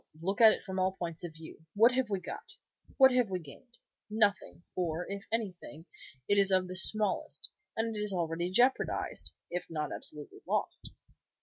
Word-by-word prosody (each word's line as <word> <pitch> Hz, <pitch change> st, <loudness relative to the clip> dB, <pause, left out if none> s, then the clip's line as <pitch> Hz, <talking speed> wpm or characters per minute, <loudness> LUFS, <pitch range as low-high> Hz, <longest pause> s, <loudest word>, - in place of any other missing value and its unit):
Look 195 Hz, +6 st, -1 dB
at 220 Hz, -1 st, +10 dB
it -, -, -3 dB
from 190 Hz, -1 st, -4 dB
all 185 Hz, 0 st, +2 dB
points 170 Hz, -3 st, -4 dB
of 165 Hz, -2 st, -7 dB
view. 160 Hz, 0 st, -12 dB
What 225 Hz, +4 st, +6 dB
have 255 Hz, -2 st, 0 dB
we 200 Hz, -2 st, -1 dB
got? 435 Hz, -, -8 dB, 0.4 s
What 265 Hz, -1 st, +8 dB
have 250 Hz, -4 st, +2 dB
we 185 Hz, -, -1 dB
gained? 210 Hz, -, -14 dB, 0.3 s
Nothing, 205 Hz, -6 st, +1 dB
or, 175 Hz, -1 st, -1 dB
if 200 Hz, 0 st, -6 dB
anything, 185 Hz, -7 st, -4 dB, 0.4 s
it 205 Hz, 0 st, +4 dB
is 195 Hz, -1 st, +4 dB
of 185 Hz, -1 st, +3 dB
the 185 Hz, -, -6 dB
smallest, 210 Hz, +2 st, +1 dB, 0.3 s
and 225 Hz, 0 st, -1 dB
it -, -, -3 dB
is 210 Hz, -1 st, -1 dB
already 170 Hz, -1 st, -1 dB
jeopardized, 245 Hz, +8 st, +1 dB, 0.2 s
if 180 Hz, +1 st, -4 dB
not 155 Hz, -2 st, -3 dB
absolutely 150 Hz, -1 st, -8 dB
lost." -, -, -2 dB
190 Hz, 180 wpm, -31 LUFS, 175-220 Hz, 0.4 s, at